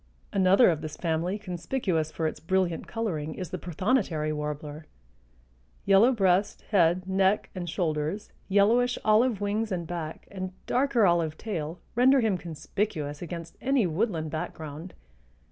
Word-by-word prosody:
Another 195 +2 +5
of 155 -2 -3
this 155 -1 -6
family 170 +3 -1
conspicuous 180 - -2
for 160 - -3
its 155 - -2
brilliant 175 0 0
coloring 160 -10 -3
is 185 - -6
the - - -4
prothonotary 175 - 0
warbler. 150 +1 -5 1.0
Yellow 200 +6 +6
breast, 195 -4 +1
head, 180 -2 +3
neck 190 +1 +2
and 175 -2 -5
shoulders, 160 +3 -2 0.2
yellowish 230 +5 +3
olive 215 0 +3
wings 210 +2 -1
and 175 -2 -2
back 165 -2 -6
and 185 -1 -5
darker 250 -4 +2
olive 170 -3 +2
tail 170 -6 -4
render 260 +3 +5
him 220 -5 +2
conspicuous 160 -2 -3
against 170 -1 -7
any 270 -4 +2
woodland 165 -3 -1
background. 155 +1 -6
180 Hz, 135 wpm, -27 LUFS, 160-210 Hz, 1.0 s, Yellow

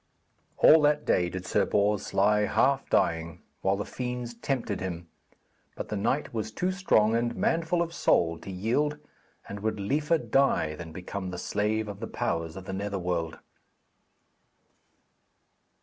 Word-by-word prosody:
All 160 0 +7
that 150 0 +2
day 90 -1 +2
did 95 +1 -6
Sir - - +2
Bors 105 0 +1
lie 105 +1 +3
half 135 +5 +2
dying, 85 0 0 0.2
while 95 +1 +2
the 100 - -3
fiends 125 -1 -4
tempted 115 -4 -2
him, 85 -2 -5 0.7
but - - -6
the 105 - -2
knight 130 +9 -1
was 110 -1 -3
too 180 +11 -1
strong 115 - +3
and 120 0 0
manful 165 +1 +1
of 170 0 -7
soul 85 - +2
to - - -10
yield, 120 +11 0 0.5
and 100 - -6
would 110 0 -2
liefer 150 +10 +1
die 135 - +1
than 80 +1 -8
become 95 +3 -5
the 90 - -6
slave 105 +4 -1
of 100 -1 -7
the - - -5
powers 80 0 -2
of 95 -1 -8
the 95 - -5
Netherworld. 90 -4 -2
105 Hz, 150 wpm, -28 LUFS, 90-135 Hz, 0.7 s, All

